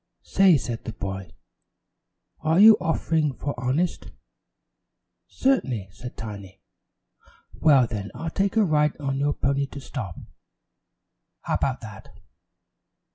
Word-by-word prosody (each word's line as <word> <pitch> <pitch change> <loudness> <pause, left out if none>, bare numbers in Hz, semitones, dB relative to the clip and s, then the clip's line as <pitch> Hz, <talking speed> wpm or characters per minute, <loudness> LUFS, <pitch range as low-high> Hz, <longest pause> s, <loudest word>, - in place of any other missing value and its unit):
"Say," 190 -5 +4
said 120 -3 -5
the 115 - -5
boy, 95 -2 -5 1.1
"are 160 +3 +2
you 220 +1 +10
offering 160 -3 0
for 145 - -4
honest?" 135 +8 -1 1.2
"Certainly," 130 - 0
said 120 +5 -10
Tiny. 100 -4 -8 0.9
"Well, 140 -6 +4
then, 105 -3 -5
I'll 165 0 -4
take 195 +4 0
a 220 - +5
ride 150 -4 +2
on 135 -2 -2
your 145 +1 +1
pony 140 +1 0
to 140 - -9
stop. 125 - -6 1.3
How - - -2
about 130 -2 -1
that?" 110 -3 -12
140 Hz, 120 wpm, -25 LUFS, 110-160 Hz, 1.3 s, you